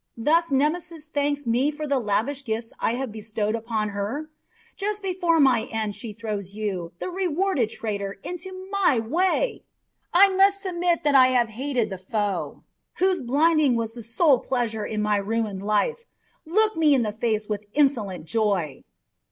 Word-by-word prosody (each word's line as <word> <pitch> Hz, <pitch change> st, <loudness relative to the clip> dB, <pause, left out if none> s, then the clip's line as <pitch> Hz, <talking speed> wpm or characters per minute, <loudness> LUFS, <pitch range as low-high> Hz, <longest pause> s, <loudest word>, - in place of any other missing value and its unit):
Thus 330 Hz, +8 st, +2 dB
Nemesis 305 Hz, +3 st, 0 dB
thanks 290 Hz, -1 st, -1 dB
me 245 Hz, +5 st, +2 dB
for 305 Hz, 0 st, -5 dB
the 280 Hz, -2 st, +1 dB
lavish 245 Hz, +6 st, -1 dB
gifts 225 Hz, -1 st, -4 dB
I 230 Hz, -, +1 dB
have 260 Hz, -2 st, -3 dB
bestowed 215 Hz, 0 st, -3 dB
upon 225 Hz, -2 st, -2 dB
her? 220 Hz, +10 st, -4 dB, 0.4 s
Just 420 Hz, 0 st, -3 dB
before 355 Hz, -3 st, +1 dB
my 250 Hz, -6 st, +4 dB
end 220 Hz, -2 st, -2 dB
she 225 Hz, +2 st, -6 dB
throws 205 Hz, -3 st, -5 dB
you, 190 Hz, -6 st, -3 dB
the 365 Hz, -, -5 dB
rewarded 360 Hz, -, 0 dB
traitor, 200 Hz, -3 st, -4 dB
into 370 Hz, +2 st, -7 dB
my 375 Hz, -9 st, +3 dB
way! 355 Hz, -, 0 dB, 0.5 s
I 390 Hz, +3 st, +7 dB
must 390 Hz, +1 st, +4 dB
submit 350 Hz, -3 st, 0 dB
to 295 Hz, -, +3 dB
have 255 Hz, -3 st, +5 dB
the -, -, -14 dB
hated 250 Hz, -4 st, -1 dB
foe, 205 Hz, +1 st, -3 dB, 0.3 s
whose 370 Hz, -2 st, +1 dB
blinding 290 Hz, +1 st, +3 dB
was 225 Hz, -1 st, -2 dB
the 240 Hz, -, -8 dB
sole 250 Hz, +5 st, +3 dB
pleasure 230 Hz, -5 st, -2 dB
in 215 Hz, -1 st, -2 dB
my 210 Hz, -1 st, +2 dB
ruined 205 Hz, -1 st, -2 dB
life, 215 Hz, -, 0 dB, 0.4 s
look 430 Hz, +5 st, +2 dB
me 310 Hz, -3 st, +4 dB
in 250 Hz, -, +2 dB
the 210 Hz, -, -1 dB
face 215 Hz, -1 st, -1 dB
with 210 Hz, -1 st, -3 dB
insolent 220 Hz, -, +1 dB
joy." 195 Hz, -9 st, 0 dB
250 Hz, 160 wpm, -24 LUFS, 215-325 Hz, 0.5 s, I